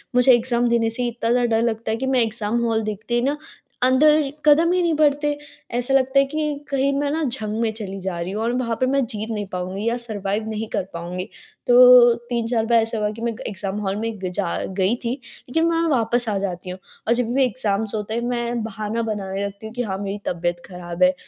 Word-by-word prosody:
मुझे 250 +1 +6
एग्जाम 240 0 +2
देने 230 -1 +2
से 230 +2 -2
ही 240 - 0
इतना 230 -1 -2
ज़्यादा 245 0 +3
डर 225 - +2
लगता 230 -1 -1
है 220 - 0
कि 265 - -3
मैं 260 -2 +3
एग्जाम 225 0 0
हॉल 225 -1 +1
देखते 215 +3 -3
ही 240 - +2
ना 280 +4 0 0.5
अंदर 290 +3 +4
क़दम 315 +3 +5
ही 365 0 +2
नहीं 340 -2 +2
बढ़ते। 295 -1 +2 0.4
ऐसा 245 +2 0
लगता 265 0 +4
है 275 - +4
कि 295 0 -3
कहीं 275 0 +1
मैं 290 0 0
ना 320 +2 -1
जंग 225 -5 -2
में 225 -1 +1
चली 195 -3 -6
जा 185 -2 -3
रही 170 +2 -3
हूँ 215 +3 -3
और 230 - +1
वहाँ 235 -3 -1
पे 255 - +3
मैं 270 0 +1
जीत 220 0 -5
नहीं 210 -2 -3
पाऊँगी 185 +3 -4
या 235 +1 +1
सरवाइव 215 -2 -3
नहीं 220 0 -3
कर 200 - 0
पाऊँगी। 175 +2 -5 0.4
तो 245 -1 +8 0.2
3-4 235 -1 0
बार 230 0 +4
ऐसा 225 +1 -2
हुआ 210 -1 0
कि 220 +2 -10
मैं 235 0 -1
ग - - -11
एग्जाम 195 -1 -4
हॉल 195 -1 -1
में 225 +1 -3
गई 185 -1 -3
जा 180 -2 -2 0.2
गई 195 +4 +2
थी 235 - -1 0.4
लेकिन 325 +6 +2
मैं 335 0 +2
वापस 240 -3 +2
आ 205 - 0
जाती 185 -2 -4
हूँ 185 +1 -6 0.3
और 230 - +4
जब 245 0 0
भी 235 - -3
मेरे 265 0 +4
एग्जाम्स 215 -3 -1
होते 210 0 -4
हैं 235 - -1
मैं 240 -1 -2
बहाना 215 +1 -3
बनाने 200 -3 -3
लगती 200 +2 -8
हूँ 220 - -8
कि 245 - -2
हाँ, 190 -4 -3
मेरी 200 0 -4
तबियत 175 0 -2
ख़राब 180 -1 -4
है 180 +1 +5
230 Hz, 245 wpm, -22 LUFS, 205-250 Hz, 0.5 s, तो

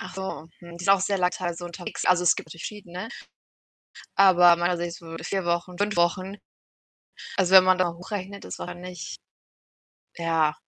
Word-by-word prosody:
Achso, 190 -6 -6
mhm. 170 -1 -11
Ist 180 - -5
auch 195 -1 +6
sehr 195 +1 0
lang 180 0 +2
teilweise 175 -1 -4
unterwegs, 175 +1 -6
also, 180 -1 +4
es 175 0 +5
gibt 160 - -8
verschiedene, 180 +3 -7 1.1
aber 180 -3 +7
meinerseits 175 0 -2
würde 165 -1 -9
4 195 -2 -2
Wochen, 175 +1 -2
5 205 0 0
Wochen. 185 +3 +1 1.0
Also, 190 -1 +2
wenn 185 - +10
man 185 0 +4
da 185 -1 +2
hochrechnet, 195 +2 -7
es - - -7
war 180 - -5
nicht 180 -2 -8 1.0
ja, 165 -2 +1
180 Hz, 155 wpm, -25 LUFS, 170-190 Hz, 1.1 s, wenn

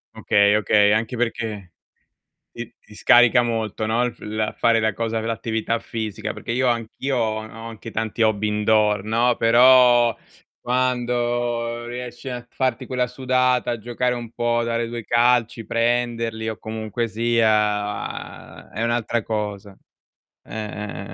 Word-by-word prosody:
Okay, 100 0 +3
okay, 105 0 +4
anche 110 +3 -1
perché 110 -6 -3 0.8
ti 120 -1 -8
ti 105 - -18
scarica 120 +3 +5
molto, 110 -2 -2
no, 115 +3 +1
il 120 - -2
f - - -29
la 110 0 -3
fare 115 -1 +2
la 110 -1 +1
cosa 115 +1 -2
v - - -6
l'attività 115 0 -2
fisica 110 -4 -5
perché - - -8
io 130 +2 +1
anch'io 120 +3 -2
ho 110 -2 0
a 110 +1 -10
ho - - -6
anche 115 0 -9
tanti 110 +1 -4
hobby 110 -1 +2
indoor, 105 -1 +2
no, 115 +2 +2
però 120 0 +6 0.5
quando 120 -1 -1
riesci 125 +2 -7
a 120 -1 -6
farti 130 -3 -1
quella 125 -1 -1
sudata, 125 0 +1
a 120 - -2
giocare 120 +2 -1
un 120 -2 -7
po', 120 0 0
dare 115 0 -1
2 115 -1 -6
calci, 120 -1 +2
prenderli 115 -1 -1
o 110 - -7
comunque 110 +2 -4
sia 110 -2 -1
è 110 - -4
un'altra 115 0 0
cosa. 105 -2 -4 0.7
Eh, - - -15
eh, 105 -2 -5
115 Hz, 150 wpm, -22 LUFS, 110-120 Hz, 0.8 s, però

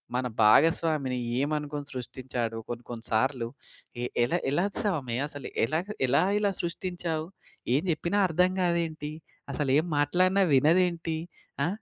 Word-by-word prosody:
మన 125 - 0 0.2
భాగస్వామిని 145 +2 +4 0.2
ఏమనుకుని 145 0 -2
సృష్టిచ్చాడు, 125 -2 -4
కొన్ని 120 0 -5
కొన్ని 115 -1 -7
సార్లు, 120 +1 +1 0.6
ఎ - - 0 0.2
ఎల 120 - 0 0.2
ఎలా 175 +7 +2 0.2
స్వామి 145 - -1
అసలు 145 -1 -8 0.2
ఎలాగ, 160 - -2 0.2
ఎలా 140 +7 +4 0.2
ఇలా 205 -1 +2
సృష్టించావు? 170 -2 -3 0.5
ఏం 145 - +3
జెప్పినా 170 +5 -1
అర్థం 180 +3 +3
కాదేంటి? 165 -4 -1 0.4
అసలేం 145 +2 +2
మాట్లాడినా 185 +7 +3
వినదేంటి? 165 +2 +3 0.5
ఆ! - - +1
155 Hz, 120 wpm, -28 LUFS, 130-170 Hz, 0.6 s, భాగస్వామిని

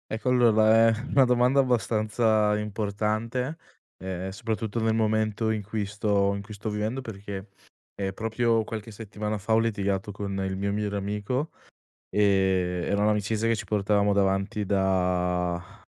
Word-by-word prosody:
Ecco 110 +4 -4
allora, 115 -2 +5
è 115 +1 -1
una 135 - +4
domanda 125 +2 +4
abbastanza 110 -3 +1
importante, 110 +6 -2 0.5
ehm, 95 0 -4
soprattutto 110 +1 -3
nel 110 0 +2
momento 110 0 +1
in 110 -1 -2
cui 105 +1 -3
sto 100 -1 +1
in 100 - -4
cui 105 +2 -10
sto 105 +2 -5
vivendo 105 +4 -2
perché, 100 -4 -7 0.5
ehm, 95 -1 -2
proprio 115 +2 0
qualche 110 0 -6
settimana 105 0 -4
fa 105 +3 -1
ho 110 - +5
litigato 100 -3 -1
con 100 -1 -4
il 95 0 -3
mio 100 +1 -1
migliore 105 -1 -2
amico, 105 +9 -2 0.6
ehm, 95 -3 +2
era 100 0 +1
un'amicizia 105 +1 +1
che 115 - +3
ci - - -6
portavamo 105 0 +1
davanti 100 +1 +1
da 90 -2 0
105 Hz, 145 wpm, -26 LUFS, 100-110 Hz, 0.6 s, allora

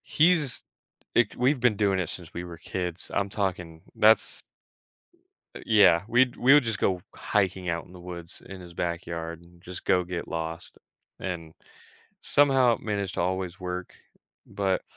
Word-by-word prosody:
He's 155 -5 +3 0.5
like, 120 -3 +3
we've 130 +3 +2
been 120 -3 +3
doing 100 -2 +2
it 90 - -2
since 85 -3 -8
we 85 - -4
were 85 -1 -8
kids, 90 +1 -5
I'm 100 0 0
talking 90 -5 -3
that's 110 +1 +4 1.1
uh, - - -7
yeah, 100 -6 +6
we'd 120 +1 +3
we 130 +3 +6
would 150 -2 +7
just 115 -3 -2
go 90 -2 +1
hiking 95 -3 0
out 85 0 -2
in - - -17
the 90 - -11
woods 85 -1 -8
in 95 -1 -9
his 85 -1 -11
backyard, 85 -1 -4
and 85 0 -20
just 90 0 -9
go 90 - +3
get 90 -1 -5
lost, 80 0 -5 0.4
and 85 -4 -5 0.7
somehow 135 -4 +4
managed 100 -3 -3
to - - -2
always 95 +1 -2
work, 90 0 -5 0.5
but, 95 -1 -1
90 Hz, 160 wpm, -27 LUFS, 85-110 Hz, 1.1 s, would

